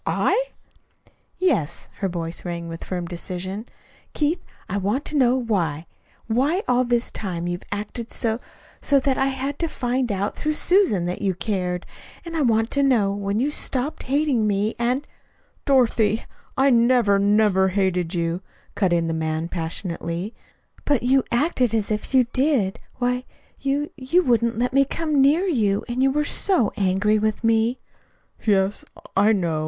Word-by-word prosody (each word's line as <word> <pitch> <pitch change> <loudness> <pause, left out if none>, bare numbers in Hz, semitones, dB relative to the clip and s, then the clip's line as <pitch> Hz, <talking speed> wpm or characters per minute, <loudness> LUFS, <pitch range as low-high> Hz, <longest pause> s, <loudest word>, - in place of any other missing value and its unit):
"I?" - - +1 0.9
"Yes." 350 - 0
Her 195 - 0
voice 170 -1 -5
rang 170 -1 -4
with 165 0 -7
firm 180 -2 -4
decision. 185 +5 -5 0.5
"Keith, 315 +4 0 0.2
I 200 - -2
want 205 +8 -1
to 305 - -4
know 255 -2 +4
why 175 - -1 0.4
why 280 - +1
all 250 0 +3
this 240 0 0
time 175 -5 -4
you've 175 0 -3
acted 210 +3 -4
so 225 0 -1 0.4
so 280 -1 +3
that 265 -1 0
I 270 - +3
had 270 +1 -3
to 335 - 0
find 250 -4 -1
out 200 +1 -2
through 305 0 -1
Susan 350 - +3
that 180 +1 -3
you 195 -3 0
cared. 180 -1 -2 0.4
And 335 -1 -6
I 320 - +1
want 225 -3 +2
to 280 - +1
know 240 -8 +3
when 200 +1 -2
you 280 +4 +1
stopped 275 0 -2
hating 275 -6 +2
me. 205 +2 0
And 250 +4 0 0.3
" - - -39
"Dorothy 230 -5 +3 0.3
I 270 +1 +4
never, 235 -4 +4
never 200 -1 +3
hated 185 -2 0
you!" 170 +1 -1 0.3
cut 190 -4 +1
in 170 -1 +2
the 165 - -1
man 160 +1 -2
passionately. 170 +3 -3 0.5
"But 285 -5 +1
you 260 +1 +4
acted 250 -3 +1
as 215 -1 -1
if 210 0 -2
you 255 -1 +6
did. 260 -8 +1 0.2
Why, 250 0 -1 0.4
you 285 +2 -1
you 300 +7 +2
wouldn't 235 -4 +2
let 250 +2 0
me 275 +1 +5
come 300 0 0
near 300 +7 +4
you, 215 - +1
and 245 +1 -2
you 270 - +4
were 300 +2 0
so 345 - +1
angry 205 +2 +2
with 215 +1 -1
me." 225 +2 +2 0.7
"Yes, 200 -1 +1 0.3
I 205 +3 +5
know." 170 -7 0
225 Hz, 165 wpm, -23 LUFS, 190-265 Hz, 0.9 s, you